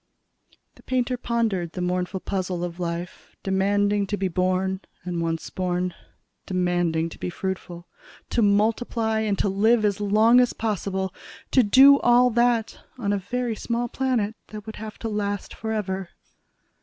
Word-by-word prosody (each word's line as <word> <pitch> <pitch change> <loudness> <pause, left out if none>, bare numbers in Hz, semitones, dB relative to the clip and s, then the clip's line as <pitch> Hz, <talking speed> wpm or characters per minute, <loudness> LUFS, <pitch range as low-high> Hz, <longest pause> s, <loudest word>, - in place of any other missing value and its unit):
The - - -19
painter 255 -1 0
pondered 225 -8 -1
the - - -5
mournful 180 +1 -1
puzzle 185 -2 -2
of 175 0 -5
life 170 0 -5
demanding 200 +1 +1
to 205 - -2
be 190 -1 -1
born 185 +2 0 0.2
and, 175 -1 -3
once 165 -1 -3
born, 180 -1 -1 0.5
demanding 175 -3 0
to - - -12
be - - -3
fruitful... 180 -1 -5 0.4
to 235 - +2
multiply 220 +2 +1
and 210 -2 0
to - - +1
live 215 +3 +3
as 205 0 0
long 215 +4 +5
as 245 -1 +3
possible 190 -3 -2 0.4
to 260 - +6
do 270 +6 +7
all 245 +1 +5
that 235 -1 +1 0.2
on 205 -4 -1
a 200 - 0
very 245 +3 -2
small 235 +2 -2
planet 235 -5 -1
that 210 -1 -9
would 220 - -8
have 215 0 -8
to 230 - -4
last 205 -2 -3
forever. 195 -4 -3
205 Hz, 155 wpm, -24 LUFS, 185-225 Hz, 0.5 s, do